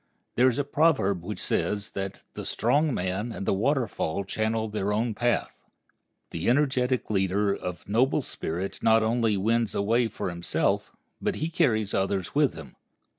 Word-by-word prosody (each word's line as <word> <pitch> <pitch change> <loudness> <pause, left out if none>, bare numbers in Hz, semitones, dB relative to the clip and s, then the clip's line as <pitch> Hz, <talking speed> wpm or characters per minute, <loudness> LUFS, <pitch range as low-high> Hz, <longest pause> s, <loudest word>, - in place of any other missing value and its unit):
There 125 +2 +5
is 125 - -3
a 145 - +1
proverb 140 - +2
which 105 +4 -5
says 105 0 -1
that 95 0 -5
"the - - -6
strong 145 +7 +1
man 95 +2 -2
and 100 - -5
the - - +2
waterfall 110 - 0
channel 110 +3 -1
their 105 -1 -2
own 110 +2 0
path." 120 +3 -1 0.7
The 85 +5 -1
energetic 130 -2 +1
leader 100 +1 +1
of 90 -2 -6
noble 120 +6 +2
spirit 90 +5 -4
not 110 0 +4
only 110 -2 +1
wins 115 +2 +1
a - - +1
way 115 +3 +2
for 100 -4 -4
himself, 85 0 -1 0.3
but - - 0 0.2
carries 110 - +2
others 95 -1 -1
with 145 -1 +2
him. 70 -5 -10
110 Hz, 160 wpm, -27 LUFS, 95-120 Hz, 0.7 s, There